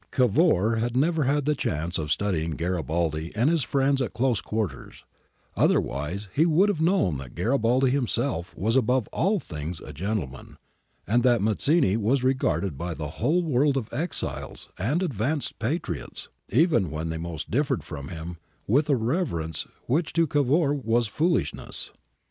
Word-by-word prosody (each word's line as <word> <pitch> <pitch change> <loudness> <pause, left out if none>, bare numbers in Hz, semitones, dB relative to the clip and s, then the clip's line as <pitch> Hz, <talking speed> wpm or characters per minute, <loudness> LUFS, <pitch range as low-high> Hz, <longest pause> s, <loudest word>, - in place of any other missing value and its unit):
Cavour 120 - +3
had 120 +2 -1
never 155 +1 +2
had 145 +1 +1
the 150 - +3
chance 85 - -2
of 75 -1 -3
studying 80 -4 0
Garibaldi 85 -2 -1
and 120 +8 +3
his 165 -2 +2
friends 135 +1 +1
at 130 - -2
close 120 -3 +1
quarters; 110 -4 -4 0.5
otherwise 80 +10 0
he 155 - +4
would 170 +5 +4
have 165 -6 -1
known 160 - +2
that 65 -3 -10
Garibaldi 125 - +2
himself 120 -8 -1
was 110 +5 0
above 125 -2 +2
all 200 +4 +1
things 80 - -6
a 75 - -10
gentleman, 80 - -4 0.5
and 120 +6 +2
that 120 -1 +4
Mazzini 110 - +2
was 120 +5 +1
regarded 130 - 0
by 85 -1 -3
the 75 0 -5
whole 160 +9 +2
world 140 -2 +2
of 115 -4 -4
exiles 160 +8 -4
and 140 - 0
advanced 140 - -2
patriots, 140 +10 -3 0.2
even 120 - +3
when 80 +2 -4
they 80 0 -3
most 80 -2 -6
differed 135 0 +1
from 70 -2 -7
him, 85 0 -7 0.3
with 145 +8 +2
a 140 - +5
reverence 110 - -2 0.2
which 155 +6 0
to 165 0 +3
Cavour 145 +1 +2
was 120 -4 +1
foolishness. 105 - 0
120 Hz, 155 wpm, -26 LUFS, 85-145 Hz, 0.5 s, a